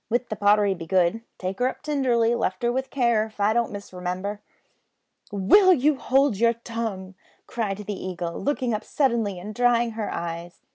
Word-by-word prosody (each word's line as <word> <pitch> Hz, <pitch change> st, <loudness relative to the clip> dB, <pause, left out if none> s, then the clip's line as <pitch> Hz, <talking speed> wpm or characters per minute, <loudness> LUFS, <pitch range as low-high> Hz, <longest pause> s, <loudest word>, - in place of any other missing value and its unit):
But 240 Hz, +1 st, 0 dB
the -, -, -1 dB
pottery 205 Hz, 0 st, +3 dB
begood 175 Hz, 0 st, +1 dB
with 225 Hz, -, -8 dB, 0.2 s
`Take 185 Hz, +1 st, -4 dB
her 250 Hz, -, +3 dB
up 260 Hz, -, -6 dB
tinderly, 250 Hz, -6 st, +2 dB
lift 185 Hz, -3 st, -2 dB
her 240 Hz, -, +2 dB
with 265 Hz, +2 st, -2 dB
care,' 235 Hz, -5 st, +2 dB
if 215 Hz, -1 st, -15 dB
I 205 Hz, +2 st, +3 dB
don't 235 Hz, 0 st, 0 dB
misremimber." 190 Hz, 0 st, -5 dB, 0.9 s
"Will 370 Hz, -, +5 dB
you 295 Hz, +2 st, +2 dB
hold 270 Hz, -4 st, +2 dB
your 230 Hz, +2 st, +3 dB
tongue!" 225 Hz, -5 st, -5 dB, 0.3 s
cried 210 Hz, -5 st, -3 dB
the 205 Hz, -1 st, -6 dB
Eagle, 175 Hz, -2 st, -4 dB
looking 260 Hz, -4 st, -1 dB
up 215 Hz, -, -2 dB
suddenly 230 Hz, -8 st, 0 dB
and 205 Hz, +4 st, -7 dB
drying 240 Hz, 0 st, +2 dB
her 220 Hz, -1 st, -4 dB
eyes. 170 Hz, +1 st, -6 dB
220 Hz, 180 wpm, -24 LUFS, 195-240 Hz, 0.9 s, Will